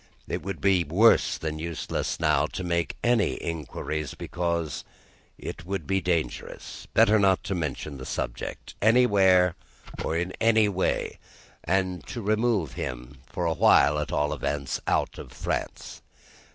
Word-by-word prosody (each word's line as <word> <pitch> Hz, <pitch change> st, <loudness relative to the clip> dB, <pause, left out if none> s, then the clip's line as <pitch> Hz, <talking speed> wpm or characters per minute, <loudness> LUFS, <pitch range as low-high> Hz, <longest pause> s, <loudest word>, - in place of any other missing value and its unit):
It -, -, -3 dB
would 95 Hz, -2 st, -5 dB
be 95 Hz, -3 st, +3 dB
worse 100 Hz, +10 st, +4 dB
than 75 Hz, -1 st, -4 dB
useless 85 Hz, 0 st, -3 dB
now -, -, +3 dB
to -, -, -3 dB
make 85 Hz, -1 st, -1 dB
any 120 Hz, -6 st, +3 dB
inquiries, 75 Hz, -1 st, -4 dB
because 85 Hz, -4 st, -2 dB, 0.5 s
it -, -, -7 dB
would 95 Hz, -2 st, -4 dB
be 95 Hz, +2 st, 0 dB
dangerous. 85 Hz, -9 st, -3 dB
Better 110 Hz, +1 st, +6 dB
not 95 Hz, -2 st, +3 dB
to -, -, -2 dB
mention 75 Hz, -4 st, -4 dB
the 65 Hz, -, -7 dB
subject, -, -, -5 dB
anywhere 100 Hz, -6 st, +5 dB, 0.5 s
or 80 Hz, -, -1 dB
in 90 Hz, +2 st, -2 dB
any 110 Hz, -1 st, +5 dB
way, 95 Hz, -2 st, -1 dB, 0.4 s
and 90 Hz, -1 st, 0 dB
to 120 Hz, -, -5 dB
remove 105 Hz, -, +1 dB
him 65 Hz, +2 st, -6 dB
for 90 Hz, -, -3 dB
a 85 Hz, -, +2 dB
while 75 Hz, -1 st, +5 dB
at 75 Hz, -, -3 dB
all 75 Hz, 0 st, +1 dB
events 70 Hz, -1 st, -2 dB
out -, -, 0 dB
of -, -, -9 dB
France. -, -, -4 dB
85 Hz, 145 wpm, -26 LUFS, 75-100 Hz, 0.5 s, Better